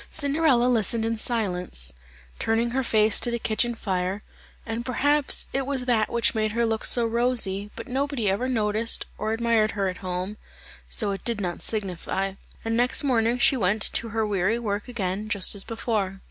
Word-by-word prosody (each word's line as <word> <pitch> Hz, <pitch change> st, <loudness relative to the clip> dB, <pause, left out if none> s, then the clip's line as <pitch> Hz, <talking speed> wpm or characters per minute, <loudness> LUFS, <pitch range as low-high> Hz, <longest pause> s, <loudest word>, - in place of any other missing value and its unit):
Cinderella 285 Hz, -4 st, +2 dB
listened 230 Hz, -2 st, +2 dB
in 230 Hz, 0 st, 0 dB
silence, 180 Hz, -, -2 dB, 0.5 s
turning 230 Hz, +1 st, +1 dB
her 265 Hz, +2 st, 0 dB
face 215 Hz, -3 st, +4 dB
to -, -, -1 dB
the 235 Hz, -, -1 dB
kitchen 235 Hz, +1 st, 0 dB
fire, 190 Hz, -1 st, -2 dB, 0.4 s
and 225 Hz, +1 st, -3 dB
perhaps 285 Hz, +3 st, +2 dB
it 270 Hz, 0 st, -1 dB
was 270 Hz, -3 st, -1 dB
that 230 Hz, -4 st, +2 dB
which 235 Hz, -1 st, +1 dB
made 215 Hz, -1 st, 0 dB
her 235 Hz, +1 st, +1 dB
look 225 Hz, -1 st, -1 dB
so 240 Hz, -1 st, +5 dB
rosy, 225 Hz, -4 st, 0 dB
but 230 Hz, +2 st, -8 dB
nobody 270 Hz, -3 st, -1 dB
ever 200 Hz, +7 st, +1 dB
noticed 220 Hz, -1 st, +1 dB
or 215 Hz, +1 st, -1 dB
admired 225 Hz, -1 st, +2 dB
her 195 Hz, -1 st, +1 dB
at 185 Hz, -, -6 dB
home, 185 Hz, +2 st, -4 dB, 0.5 s
so 210 Hz, -4 st, +1 dB
it 195 Hz, -, -5 dB
did 235 Hz, -3 st, 0 dB
not 175 Hz, -3 st, -3 dB
signify, 195 Hz, -2 st, -2 dB, 0.3 s
and 225 Hz, 0 st, 0 dB
next 245 Hz, +5 st, +2 dB
morning 240 Hz, -3 st, +2 dB
she 270 Hz, +1 st, +4 dB
went 205 Hz, -2 st, +1 dB
to 230 Hz, -, 0 dB
her 225 Hz, 0 st, 0 dB
weary 205 Hz, +2 st, +1 dB
work 205 Hz, -2 st, -3 dB
again 210 Hz, -3 st, -3 dB
just 200 Hz, -2 st, +3 dB
as 200 Hz, -1 st, -3 dB
before. 215 Hz, -4 st, -2 dB
225 Hz, 180 wpm, -25 LUFS, 200-240 Hz, 0.5 s, so